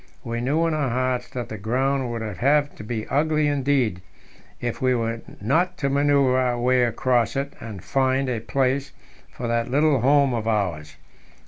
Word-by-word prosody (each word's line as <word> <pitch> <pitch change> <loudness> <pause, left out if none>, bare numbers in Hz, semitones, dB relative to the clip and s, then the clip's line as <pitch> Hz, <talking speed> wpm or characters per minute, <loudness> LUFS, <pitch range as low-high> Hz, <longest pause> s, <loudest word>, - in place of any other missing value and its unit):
We 115 0 -3
knew 150 +7 +1
in 165 - 0
our 145 -4 0
hearts 125 0 -1
that 125 -2 -5
the 110 - -6
ground 130 +4 0
would 115 -1 -4
have 140 +8 +1
to - - -10
be 110 0 -4
ugly 155 +1 +1
indeed 135 -9 +1 0.6
if 120 -1 -4
we 130 -1 +3
were 115 -1 -2 0.2
not 175 - +1
to 140 - -1
manoeuvre 140 -2 +3
our 125 -1 0
way 125 0 +3
across 120 +1 +1
it 140 +1 -2
and 105 -6 -8
find 135 0 +1
a 125 -3 -1
place 130 +4 -1 0.4
for 120 - -6
that 115 0 0
little 145 0 +3
home 140 0 +4
of 115 -2 -2
ours. 85 -9 -1
125 Hz, 180 wpm, -23 LUFS, 115-140 Hz, 0.6 s, home